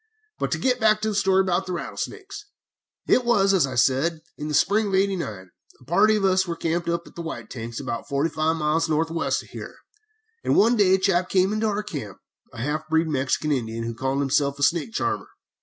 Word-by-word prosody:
But - - -1
to - - 0
get 250 -1 +1
back 215 -1 +4
to 220 - 0
the - - -2
story 195 -1 +3
about 185 0 -1
rattlesnakes: 395 - -6 0.6
"It 255 - +4
was, 200 -5 +3
as 175 -8 +3
I 130 - -6
said, 135 +7 +2
in 150 - -6
the 150 - -1
spring 205 +7 +3
of 195 - 0
'89, 170 - -1 0.3
a - - -19
party 195 - +3
of 205 -2 +1
us 190 0 +3
were 170 - -2
camped 170 +1 -2
at 170 0 -1
the 170 - -5
White 120 -9 -7
Tanks 115 -1 -6
about 115 - -5
forty 140 +3 0
five 155 +1 0
miles 160 +1 0
north 160 +1 +1
west 165 - -1
of - - -18
here, - - -9 0.7
and - - +1
one 230 +3 +5
day 195 -4 +5
a - - +2
chap 185 -2 +1
came 190 +1 +2
into 215 +1 0
our 210 0 -1
camp, 115 - -7 0.3
a - - -13
half 155 +2 -3
breed 160 0 +2
Mexican 140 +2 0
Indian, 115 -4 -2
who 115 0 -3
called 135 +4 -1
himself 140 0 +1
a 145 - -3
snake 170 +7 +1
charmer. - - -2
170 Hz, 220 wpm, -24 LUFS, 140-195 Hz, 0.7 s, one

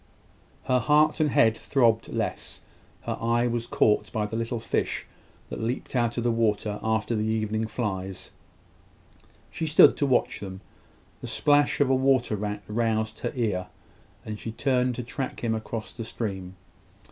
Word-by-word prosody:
Her 130 -1 +2
heart 150 +6 +3
and 155 -1 +3
head 115 -4 +4
throbbed 115 -3 +2
less. - - -4 0.4
Her - - -4
eye 120 +1 +2
was 120 -1 -1
caught 105 -2 +2
by 105 -1 -1
the 105 +2 -5
little 115 +1 -2
fish - - -2 0.5
that - - -5
leaped 120 +4 -3
out 120 -1 +1
of 120 - 0
the 120 - +2
water 105 -2 0
after 110 +1 0
the 110 0 0
evening 110 0 -1
flies: 95 -4 -4 1.2
she 160 - -3
stood 150 - +7
to 145 - +1
watch 130 -2 +1
them. 95 -1 -7 0.6
The - - -6
splash 145 -1 +2
of 140 -2 +3
a - - +5
water 130 -4 +2
rat 105 0 -4
roused 110 0 -1
her - - -2
ear, 105 -7 -1 0.6
and 105 -1 -5
she 115 - -5
turned 125 +1 +1
to 125 - -4
track 125 +2 -5
him 115 -1 +1
across 110 0 -4
the 115 - -7
stream. 95 -5 -5
115 Hz, 165 wpm, -26 LUFS, 105-125 Hz, 1.2 s, stood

